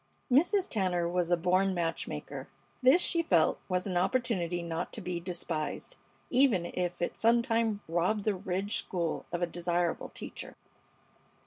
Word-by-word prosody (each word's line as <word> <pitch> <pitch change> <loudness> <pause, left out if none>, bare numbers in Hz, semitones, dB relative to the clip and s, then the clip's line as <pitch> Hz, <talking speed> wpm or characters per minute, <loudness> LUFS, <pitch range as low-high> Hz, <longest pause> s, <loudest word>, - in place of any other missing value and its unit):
Mrs. 355 - +4
Tanner 180 -5 0
was 175 0 0
a 175 - +3
born 185 +3 +2
match 170 -1 -1
maker. - - -6 0.3
This 265 +8 +6
she 335 - +3
felt 170 - +3
was 180 -1 0
an 185 -3 -1
opportunity 180 -4 0
not 165 -1 -3
to - - -4
be 180 -1 -3
despised, 170 - -3 0.4
even 245 -9 +4
if 175 -1 -2
it - - -2
sometime 230 -2 +2
robbed 180 +6 +1
the 215 - +2
Ridge 190 +2 -1
School 170 -3 -2
of 175 0 -1
a - - +4
desirable 175 0 -1
teacher. - - -8
180 Hz, 150 wpm, -30 LUFS, 175-225 Hz, 0.4 s, This